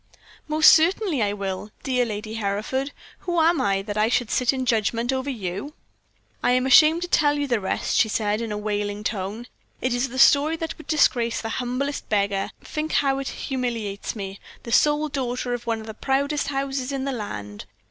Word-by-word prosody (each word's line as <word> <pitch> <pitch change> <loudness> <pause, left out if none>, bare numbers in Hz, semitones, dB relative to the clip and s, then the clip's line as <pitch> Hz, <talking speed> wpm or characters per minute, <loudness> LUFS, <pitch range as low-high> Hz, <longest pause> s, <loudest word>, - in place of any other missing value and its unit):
"Most 305 0 +7
certainly 335 - +2
I 205 -1 +1
will, 195 0 -4
dear 250 -2 +1
Lady 215 0 -5
Hereford. 225 +6 -2 0.3
Who 350 -2 -1
am 325 -2 +3
I, 195 -2 +1
that 205 0 -5
I 215 +1 +3
should 240 -2 0
sit 250 -1 +2
in 260 -1 -3
judgment 230 +1 +1
over 260 +1 -2
you?" 210 +3 -5 0.7
"I 245 - +3
am 255 0 +2
ashamed 310 +6 +6
to - - -3
tell 295 -4 +3
you 290 - 0
the 240 -5 0
rest," 190 - -1
she 220 - +4
said, 210 0 0
in 230 -2 -4
a 210 - -2
wailing 205 0 -3
tone. 205 +2 -3 0.3
"It 255 -1 0
is 245 +2 0
a 260 - -7
story 290 +4 +5
that 325 0 -4
would 315 - -12
disgrace 240 -7 +2
the 225 - -4
humblest 255 +5 -3
beggar 200 -2 0
think 310 +1 -4
how 275 -1 +2
it 275 - -4
humiliates 235 -6 -3
me, 195 -2 -6 0.2
the 235 - -7
sole 295 +4 +3
daughter 250 -3 -2
of 240 0 -5
one 225 -1 0
of - - -10
the 220 - -7
proudest 280 +5 0
houses 275 -1 -2
in 270 -1 -3
the 275 - -1
land. 105 - -6
245 Hz, 200 wpm, -24 LUFS, 210-280 Hz, 0.7 s, Most